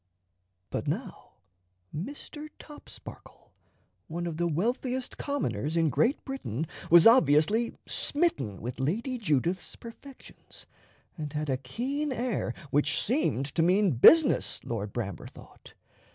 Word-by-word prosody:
But - - -3
now - - -5 0.6
Mr. 290 - -7
Topsparkle, 295 -1 -13 0.6
one 170 +1 -4
of 165 -2 -4
the 175 +1 0
wealthiest 245 - -2
commoners 160 - -2
in 165 -3 +2
Great 245 - +1
Britain, 165 - -4 0.2
was 170 0 +7
obviously 220 - +4
smitten 140 - -1
with 125 +2 -5
Lady 230 - -2
Judith's 175 - -1
perfections, 250 +4 -13 0.5
and 150 -2 -4
had 150 -1 -2
a 130 - 0
keen 260 - -3
air 245 -2 -2 0.2
which 145 +1 +3
seemed 240 - 0
to 165 - +1
mean 185 +3 +3
business, 285 - +5
Lord 105 -3 -4
Bramber 100 -7 -5
thought. - - -16
175 Hz, 120 wpm, -28 LUFS, -, 0.6 s, was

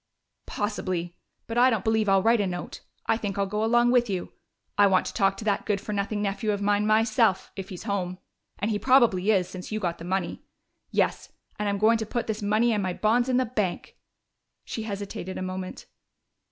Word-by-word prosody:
"Possibly. 185 -4 -3 0.3
But 230 +1 -1
I 255 +1 +7
don't 220 -6 0
believe 220 -2 +2
I'll 195 -1 +4
write 230 -1 +4
a 200 - 0
note 175 -1 -6 0.2
I 225 - +2
think 205 -3 -4
I'll 200 - +2
go 210 +2 -2
along 240 +2 +4
with 245 -2 +3
you! 185 -3 -3 0.4
I 205 0 +6
want 185 -2 +3
to - - -5
talk 195 -2 +2
to 220 - -7
that 205 -2 0
good 205 -2 +1
for 210 +1 -5
nothing 205 +1 -1
nephew 205 +2 -2
of 205 - -1
mine 205 +1 +1
myself 220 -2 +2
if 195 -1 -6
he's 180 - -7
home. 185 -4 -2 0.4
And 210 +3 -1
he 205 - 0
probably 235 -7 +4
is, 190 -4 +3
since 180 +2 -8
you 215 - -1
got 175 -4 -2
the - - -8
money.... 185 +2 -2 0.5
Yes, - - 0 0.3
and 210 -1 0
I'm 200 - 0
going 220 +3 +4
to 220 - -3
put 240 +1 -2
this 220 0 -3
money 215 +3 +2
and 210 - 0
my 185 -2 -1
bonds 235 +6 +2
in 250 - +3
the 255 - +2
bank!" 210 -7 -3 0.7
She 225 - -4
hesitated 200 -3 -5
a - - -3
moment. 185 0 -5
205 Hz, 215 wpm, -26 LUFS, 190-225 Hz, 0.7 s, I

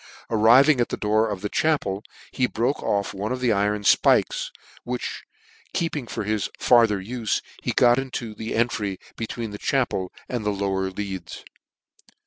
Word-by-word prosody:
Arriving 120 +5 +6
at 120 - 0
the - - -3
door 110 +1 +2
of 100 -3 -4
the 105 - -1
chapel, 105 -7 0 0.3
he 130 - +1
broke 120 +5 -1
off" 100 0 -1
one 100 +3 -3
of 130 - -2
the 125 -2 +2
iron 105 0 +1
fpikes, - - +3 0.4
which - - -4 0.5
keeping 155 -7 -1
for - - -4
his 105 -1 -1
farther 115 -5 +4
ufe, 110 +3 -2 0.2
he - - -1
got 120 +1 +4
into 125 -4 -5
an 110 - -4
entry 110 -4 0 0.2
between 115 0 -4
the 105 - -7
chapel 120 -9 0 0.2
and 120 -3 -3
the 105 - 0
lower 95 -1 -1
leads. 95 -2 -6
110 Hz, 160 wpm, -24 LUFS, 100-125 Hz, 0.5 s, Arriving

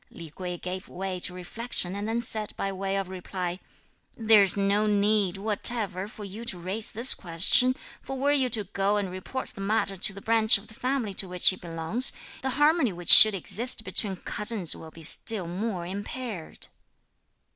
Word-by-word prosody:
Li 165 -3 -12
Kuei 180 +2 -7
gave 185 +2 -7
way 185 0 -6
to 180 - -1
reflection 185 +1 -2
and 205 +1 -5
then 230 +1 -2
said 220 -3 -3
by 195 - -3
way 195 0 -4
of 195 -1 -4
reply: 185 -1 -6 0.6
"There's 215 -4 +4
no 200 +2 0
need 205 -2 0
whatever 205 -2 +5
for 215 -1 -12
you 205 +3 -9
to 215 -6 -5
raise 190 +5 -1
this 235 +5 +2
question; 185 +9 +1 0.3
for 270 - -7
were 280 +2 0
you 270 -3 +1
to 220 -2 -2
go 195 +1 -2
and 195 -3 -4
report 185 +8 -7
the 195 - -7
matter 200 0 -1
to 195 +2 +1
the 195 - -11
branch 220 0 +3
of 200 +2 -15
the - - -12
family 250 -3 -3
to 190 -1 -3
which 180 -1 +4
he 185 - 0
belongs, 170 +8 +1 0.3
the 265 - -3
harmony 295 -4 +2
which 175 -1 +2
should 215 -2 +10
exist 220 +6 +1
between 205 -3 -2
cousins 210 -1 -1
will 160 - -12
be 165 +1 -13
still 200 +4 +2
more 185 0 -5
impaired." 205 0 -7
200 Hz, 185 wpm, -25 LUFS, 185-225 Hz, 0.6 s, should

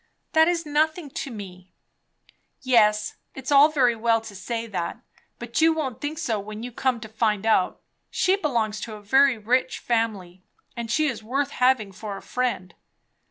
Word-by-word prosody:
"That 320 0 +6
is 340 -1 0
nothing 310 +1 0
to 275 - -5
me." 185 -5 -10 0.9
"Yes, 215 -4 +3 0.2
it's 265 +1 -6
all 285 +2 +7
very 255 -6 +2
well 225 0 +2
to 220 -2 -10
say 230 +4 -4
that, 185 -6 -4 0.4
but - - -3
you 325 0 +5
won't 265 -6 -4
think 295 +2 -3
so 240 -10 -1
when 215 +2 -7
you 245 - -6
come 250 0 0
to 220 - -7
find 220 -2 0
out. 215 -5 +2 0.3
She 370 - +2
belongs 230 - -1
to 220 - -6
a 210 - -12
very 265 +4 +4
rich 250 +5 0
family, 205 -6 -2 0.3
and 235 -1 -5
she 310 +7 +2
is 240 -7 -2
worth 275 +6 -1
having 250 -5 +2
for 200 +1 -7
a - - -10
friend." 245 -8 -2
235 Hz, 175 wpm, -24 LUFS, 215-275 Hz, 0.9 s, all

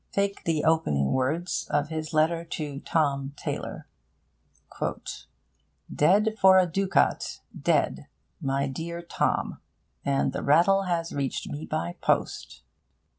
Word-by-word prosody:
Take 200 0 -1
the 160 -2 +1
opening 75 - +2
words 155 +8 -1
of 145 +1 0
his 155 -1 -4
letter 165 +2 +2
to 150 -4 -5
Tom 140 -3 0
Taylor: - - -5 2.1
'Dead 205 +8 +3
for 190 0 +8
a 185 - +6
ducat, 190 +3 +1
dead! - - 0 0.3
my 135 -1 0
dear 170 +5 -5
Tom: 170 - -1 0.4
and 140 -1 +1
the - - -3
rattle 185 +7 +4
has 170 -2 -1
reached 140 -2 -2
me 150 +2 -6
by 85 +1 -3
post. - - -1
160 Hz, 120 wpm, -27 LUFS, 140-175 Hz, 2.1 s, for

